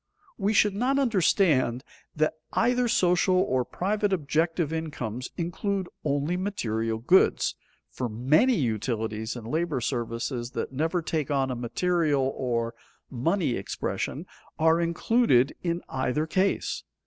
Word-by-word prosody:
We 200 +1 +1
should 205 -1 +4
not 250 +7 +1
understand 170 - +2 0.3
that 155 0 +1 0.2
either 245 0 +2
social 180 -3 +3
or 130 -9 +2
private 205 +7 -1
objective 160 -1 0
incomes 130 -7 -4
include 185 +2 -2
only 145 +4 0
material 115 - -2
goods, 175 +12 +3 0.4
for 125 -2 -3
many 150 - +3
utilities 110 - -2
and 120 -3 -8
labor 160 +1 -1
services 120 0 -3
that - - -3
never 160 +5 0
take 155 -3 -2
on 135 -2 +1
a - - -2
material 145 +2 0
or 115 -2 -1 0.4
money 160 +6 0
expression - - -3 0.3
are 160 +1 +3
included 170 - +2
in 170 0 -2
either 135 +3 -1
case. 185 +4 0
155 Hz, 125 wpm, -27 LUFS, 125-185 Hz, 0.4 s, should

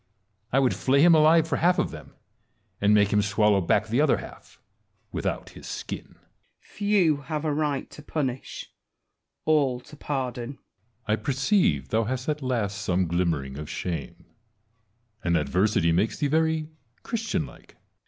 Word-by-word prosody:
I 130 - +2
would 135 -2 +3
flay 140 +2 +3
him 175 0 +7
alive 160 +1 +5
for - - 0
half 180 +2 +3
of - - 0
them, - - -11 0.7
and 100 +1 +4
make 105 -1 +4
him 105 - +4
swallow 105 -1 +3
back 85 - +2
the 120 +6 +1
other 155 - +3
half - - -12 0.5
without - - -3
his - - -11
skin. - - -6
Wallace. - - -32 0.3
Few 200 -7 +1
have 150 +2 -4
a 150 - +1
right 145 -2 -1
to - - -11
punish; 135 -4 -4 0.7
all 140 -5 +2
to 150 - -14
pardon. 130 -3 -3
Edioard. 135 - -23 0.5
I 105 - +3
perceive 130 - +1
thou 110 0 +1
hast 130 +2 -3
at 150 -1 -1
last 110 -6 -1
some 90 0 +1
glimmering 80 -6 -1
of 75 0 -7
shame; 85 +1 -5 1.0
and 85 -1 +2
adversity 85 +3 +2
makes 95 +7 +1
thee - - 0
very 160 +1 +1 0.3
Christian 225 -1 -2
like. - - -15
Wallace. - - -39
130 Hz, 165 wpm, -26 LUFS, 100-155 Hz, 1.0 s, him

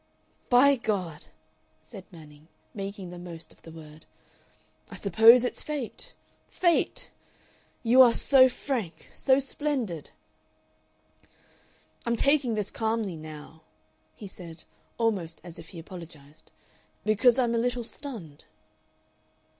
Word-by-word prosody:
"By 275 +3 +6
God!" 190 -9 -3 0.6
said 195 -5 -12
Manning, 155 -3 -15 0.3
making 195 -2 -6
the 175 - -9
most 170 -2 -10
of - - -28
the - - -13
word, 155 -1 -13 0.8
"I - - -9
suppose 225 +5 +6
it's - - -4
fate. 290 -6 -6 0.3
Fate! 345 -2 0 0.7
You 250 +3 +6
are 240 -3 +7
so 260 -2 +6
frank 230 - -5
so 265 -1 +3
splendid! 270 - -3 1.9
"I'm 235 0 0
taking 275 -2 +2
this 210 -2 -3
calmly 220 -4 -2
now," 155 0 -11 0.5
he 210 - -10
said, 170 -4 -10 0.3
almost 190 -9 -1
as 175 -2 -11
if 165 - -12
he 175 - -11
apologized, 160 -4 -12 0.5
"because 220 +3 +4
I'm 240 -3 +2
a 230 - +1
little 245 0 -1
stunned." 220 - -7
210 Hz, 115 wpm, -27 LUFS, 165-245 Hz, 1.9 s, are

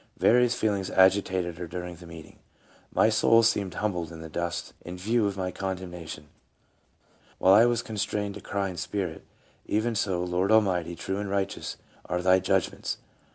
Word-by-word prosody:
Various 125 0 +4
feelings 100 -4 0
agitated 95 -2 +2
her 90 - -5
during 90 +1 -6
the 85 0 -13
meet 80 -2 -10
ing: - - -20 0.2
' - - -32
' - - -32
My - - +6
soul 115 +1 +5
seemed 100 -5 +1
humbled 90 -6 -2
in 80 - -9
the 80 - -8
dust 85 +1 -3
in 90 +1 -7
view 110 +4 +1
of 100 -1 -4
my 90 -1 -2
condemnation; 90 -5 -6 1.1
while 95 - +5
I 110 +4 +7
was 120 -1 +1
constrained 105 -1 -2
to 105 - -9
cry 100 0 -2
in 90 - -8
spirit, 85 0 -3 0.4
'Even 110 +3 0
so, 95 -4 0
Lord 90 +3 0
Almighty, 90 -6 +3
true 95 +3 -3
and 105 -1 -3
righteous 100 0 -2 0.3
are 90 +1 -2
Thy 95 0 +5
judg 95 -1 +1
ments - - -5
95 Hz, 185 wpm, -27 LUFS, 90-105 Hz, 1.1 s, I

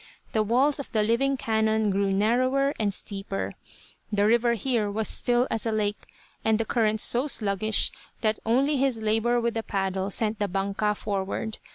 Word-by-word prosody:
The 220 - +1
walls 260 +7 +2
of 280 - -7
the 215 -2 +2
living 265 +5 +1
canon 220 -2 +1
grew 195 0 +1
narrower 255 +7 +2
and 210 -2 +1
steeper. 195 0 -4 0.6
The 205 -1 +2
river 235 +2 +3
here 230 -3 0
was 215 +2 -1
as - - +3
still 245 +1 +2
as 225 +1 -2
a - - 0
lake, 210 -1 -2 0.4
and 220 -1 +3
the 225 - 0
current 220 -1 +1
so 245 +6 +3
sluggish 215 -4 0 0.3
that 215 -1 0
only 270 +6 +2
his 265 -3 +1
labour 225 +3 +1
with 235 0 0
the 225 - -2
paddle 195 -2 -2
sent 215 +1 -1
the 205 - 0
"banca" 200 +2 -1
forward. 205 +2 -3
220 Hz, 180 wpm, -26 LUFS, 205-240 Hz, 0.6 s, river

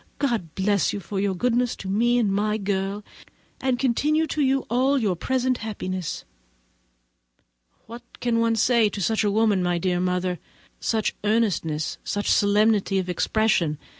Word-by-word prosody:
God 230 - -2
bless 200 -1 +1
you, 205 - -3
for 195 +1 -5
your 195 -1 0
goodness 245 +4 0
to 195 - -9
me 235 +5 +2
and 210 -5 +1
my 210 +2 0
girl, 200 0 -2 0.6
and 260 -2 0
continue 290 +5 +1
to 310 - -2
you 270 -1 +2
all 260 +4 +2
your 210 -8 0
present 255 +5 -1
happiness." 185 -6 -5 1.6
What 235 +2 -9 0.2
can 235 -1 0
one 230 0 +2
say 235 0 +3
of 205 -1 -4
such 220 +3 +1
a 205 - +2
woman, 210 -2 +2
my 175 -1 0
dear 180 0 0
mother? 180 -1 -1 0.4
Such 220 -2 0
earnestness, 200 -8 0
such 205 0 -1
solemnity 205 -1 +3
of 185 -1 -2
expression! 180 -4 +1
210 Hz, 155 wpm, -24 LUFS, 190-235 Hz, 1.6 s, say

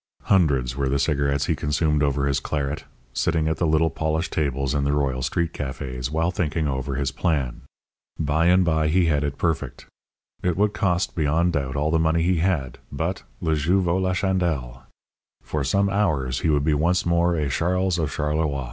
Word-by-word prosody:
Hundreds 70 -10 +2
were 70 -1 -1
the 70 - +1
cigarettes 70 -1 +1
he - - 0
consumed 75 0 0
over 70 -1 +1
his 70 -1 +1
claret, 70 +1 -3 0.3
sitting 80 0 0
at 80 0 0
the 85 - +1
little 80 +1 +2
polished 80 +1 -2
tables 70 -2 -1
in 70 -1 0
the 70 +1 +1
Royal 70 -3 0
street 85 +5 -1
cafés 65 -2 -4
while 80 +3 0
thinking 80 -3 -1
over 65 0 -2
his 70 -1 -1
plan. 70 -8 -1 0.6
By 80 +2 +1
and 90 +1 +5
by 80 -2 +2
he 85 +3 +3
had 75 -3 +1
it 70 -1 -3
perfect. 85 -2 -2 0.6
It 90 -1 0
would 105 +1 +2
cost, 95 -3 0
beyond 80 +3 +1
doubt, 70 -3 -2
all 75 +2 0
the 80 - +2
money 80 +1 +2
he 90 +1 +2
had, 80 -8 -1
but - - -2 0.2
le 80 -1 +1
jeu 85 +6 +2
vaut 90 0 +1
la 95 0 +1
chandelle 85 -11 -1 0.6
for 75 -2 -2
some 100 +8 +2
hours 80 -11 0
he 80 - 0
would 75 -2 +2
be 80 +1 +2
once 85 +5 +1
more 85 0 +2
a 75 -3 0
Charles 90 +4 0
of 80 -3 0
Charleroi. 75 0 -1
80 Hz, 190 wpm, -24 LUFS, 70-85 Hz, 0.6 s, and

